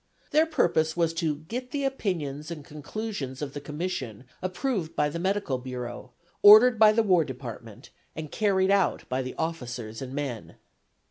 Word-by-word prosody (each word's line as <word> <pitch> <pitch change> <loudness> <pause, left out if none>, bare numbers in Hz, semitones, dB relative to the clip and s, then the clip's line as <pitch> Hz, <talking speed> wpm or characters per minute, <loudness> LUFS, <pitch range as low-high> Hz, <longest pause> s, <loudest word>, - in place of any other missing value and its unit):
Their 310 +2 +4
purpose 160 - +1
was 165 -1 +2
to 165 -3 0
"get 235 - -6
the 280 +2 -2
opinions 170 - -2
and 155 -4 -7
conclusions 150 - -5
of 145 -2 -5
the 145 - -6
Commission 150 - -4 0.2
approved 185 - -2
by 150 0 +2
the 170 - -5
Medical 190 -8 -1
Bureau, 125 -1 -6 0.3
ordered 220 +3 +9
by 215 -1 +8
the 225 +1 +2
War 180 -5 +4
Department 120 -3 -9 0.2
and 155 -2 -6
carried 195 -2 +2
out 200 -2 +1
by 130 +1 0
the 130 0 -6
officers 125 -9 -4
and 130 -1 -6
men." 135 -6 -4
160 Hz, 160 wpm, -27 LUFS, 130-200 Hz, 0.3 s, ordered